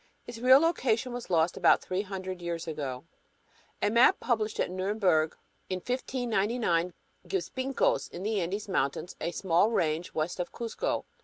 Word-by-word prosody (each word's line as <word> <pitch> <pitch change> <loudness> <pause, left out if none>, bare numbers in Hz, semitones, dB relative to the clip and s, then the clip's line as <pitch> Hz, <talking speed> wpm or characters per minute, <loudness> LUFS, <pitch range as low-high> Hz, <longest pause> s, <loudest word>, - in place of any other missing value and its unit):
Its 240 -1 -8
real 255 +2 +8
location 260 -6 +1
was 245 -1 -6
lost 170 0 +2
about - - +5
three 185 +1 -2
hundred 190 -2 -6
years 170 -1 -4
ago. 140 -4 -4 0.8
A 205 - +3
map 235 +3 +5
published 220 -4 -1
at - - 0
Nuremberg 185 -4 +1 0.3
in 185 - -1
1599 225 -6 -1 0.3
gives 390 - -2
"Pincos" 275 - 0
in 175 - -7
the 210 -1 0
"Andes" 195 +5 -3
mountains, 175 -2 -1
a - - -1
small 175 +3 +2
range 165 -5 0
west 160 +4 -2
of 180 - -3
"Cusco." 235 - -3
195 Hz, 155 wpm, -29 LUFS, 175-240 Hz, 0.8 s, real